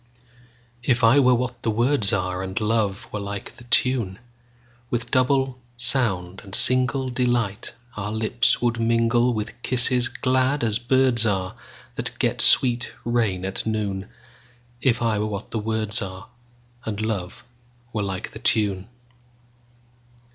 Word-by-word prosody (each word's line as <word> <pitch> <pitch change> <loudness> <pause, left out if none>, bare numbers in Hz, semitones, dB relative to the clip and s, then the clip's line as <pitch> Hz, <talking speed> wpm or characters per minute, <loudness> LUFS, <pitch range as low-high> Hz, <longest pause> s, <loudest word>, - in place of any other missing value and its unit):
If 120 0 +1
I 115 +5 +6
were 125 -2 +5
what 125 0 -3
the 115 - -1
words 115 -1 +2
are, 90 -1 -1
And 95 +3 -3
love 105 -3 0
were 105 - -2
like 100 0 -6
the 120 - -14
tune, 120 -6 +1 0.7
With 120 -1 -3
double 130 0 +2 0.2
sound 95 -8 0
and 95 - -13
singleDelight 125 -4 +1 0.2
our 105 0 -4
lips 110 +3 +1
would 115 -1 +1
mingle, 115 +1 +2
With 110 +1 -5
kisses 125 0 +3
glad 130 +2 0
as 110 -1 +1
birds 125 -1 +3
areThat 95 -3 -4
get - - 0
sweet 120 -2 +4
rain 115 -6 0
at 95 0 -2
noon; 100 -3 -2 0.7
If 120 -2 +2
I 110 -2 +1
were 105 - -1
what 100 -1 -6
the 110 - -2
words 110 0 -1
areAnd 120 +3 -9
love 110 +2 -4 0.5
were 110 - -1
like 95 -2 -4
the - - -10
tune. 100 -3 +1
115 Hz, 135 wpm, -23 LUFS, 100-125 Hz, 0.7 s, I